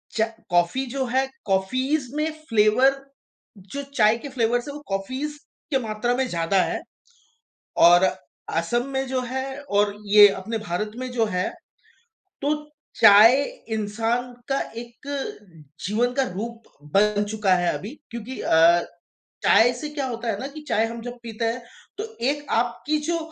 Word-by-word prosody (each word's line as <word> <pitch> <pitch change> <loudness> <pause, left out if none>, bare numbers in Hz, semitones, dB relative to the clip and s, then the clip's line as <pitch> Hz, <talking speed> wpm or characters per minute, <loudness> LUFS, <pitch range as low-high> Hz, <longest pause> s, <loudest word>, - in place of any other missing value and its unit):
चाय 220 0 0 0.2
कॉफ़ी 175 +10 +2
जो 265 -1 0
है 260 +2 +1 0.2
कॉफ़ीज़ 255 +9 0
में 305 +1 0 0.2
फ़्लेवर 225 +5 +4 0.8
जो 280 - -3
चाय 215 +2 +4
के 280 +4 -8
फ़्लेवर्स 240 -1 0
है 285 - -5
वो 295 - -8
कॉफ़ीज़ 260 +10 -3 0.3
के 270 - +3
मात्रा 225 +1 -1
में 260 +1 0
ज़्यादा 175 -1 +1
है। - - -3 1.1
और 175 +1 +6 0.5
असम 240 +9 0
में 265 0 0
जो 260 0 -1
है 260 +2 -3 0.2
और 205 -6 +1
ये 205 0 +9
अपने 195 +4 -4
भारत 210 0 -3
में 255 0 -4
जो 235 -2 +1
है। 180 - 0 0.9
तो 290 +2 +2 0.4
चाय 225 +5 +8 0.3
इंसान 225 +4 -1 0.2
का 270 - +1 0.2
एक 240 +4 -10 0.8
जीवन 230 +5 +1
का 270 +1 +2
रूप 230 +4 -6 0.3
बन 210 0 +3
चुका 210 -3 +2
है 175 -1 +1
अभी। 215 +9 -6 0.2
क्योंकि 235 +2 -7
अ, 170 +2 +5 0.6
चाय 240 +2 +6
से 300 - -4
क्या 285 -3 -3
होता 235 -1 -4
है 200 - -3
ना, 265 - -4
कि 290 +2 -9
चाय 220 - +2
हम 230 +1 -6
जब 245 +1 -7
पीते 230 -1 -4
हैं 230 +2 -1 0.4
तो 420 - -2 0.2
एक 290 +4 -1
आपकी 245 +6 0
जो 340 0 +1
235 Hz, 155 wpm, -24 LUFS, 210-260 Hz, 1.1 s, ये